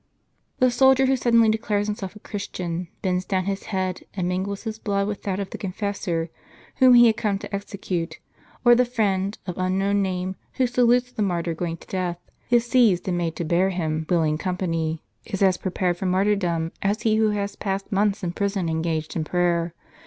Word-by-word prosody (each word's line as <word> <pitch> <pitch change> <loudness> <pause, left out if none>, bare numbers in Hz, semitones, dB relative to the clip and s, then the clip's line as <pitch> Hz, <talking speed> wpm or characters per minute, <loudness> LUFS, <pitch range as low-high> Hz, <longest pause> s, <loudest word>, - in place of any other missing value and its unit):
The 255 -1 +4
soldier 265 +1 +5
who 265 0 +3
sud 240 -2 +1
denly 225 -1 +6
declares 215 -2 0
himself 205 -2 -4
a - - -11
Christian, 180 -4 -4 0.2
bends 185 -1 0
down 185 -1 -1
his 195 0 -3
head, 185 -2 -2
and 180 -3 -1
mingles 190 +2 -2
his 220 -1 -5
blood 200 -2 0
with 210 -1 -4
that 195 -1 -2
of 200 - -4
the - - -6
confessor, 185 -4 -3 0.5
whom 255 -2 +7
he 240 0 +8
had 220 -2 +4
come 210 -4 0
to 205 0 -6
execute; 190 -4 -4 0.5
or 240 - +8
the 245 +1 +5
friend, 205 -5 0
of 180 -1 -5
unknown 195 +2 +1
name, 185 0 -2 0.2
who 260 - +2
salutes 245 0 +3
the 220 - -4
martyr 175 -4 0
going 165 0 -3
to - - -17
death, 180 -2 -2 0.3
is 240 -1 +4
seized, 230 -8 +3
and 175 -2 0
made 165 -2 -2
to 170 - -3
bear 175 +4 +2
him 160 -4 -1
If 160 - -11
willing 155 -3 +2
company,* 165 -4 -2 0.2
is 195 -2 -2
as 185 -2 +4
prepared 180 -2 -1
for 190 - -2
martyrdom, 180 -4 +1
as 205 +3 0
he 220 -1 +3
who 220 -1 +3
has 205 -1 -2
passed 195 -1 -3
months 200 0 +1
in 175 - -1
prison 195 -2 -1
engaged 160 -1 -2
in 160 - 0
prayer. 170 0 0
195 Hz, 200 wpm, -24 LUFS, 175-210 Hz, 0.5 s, he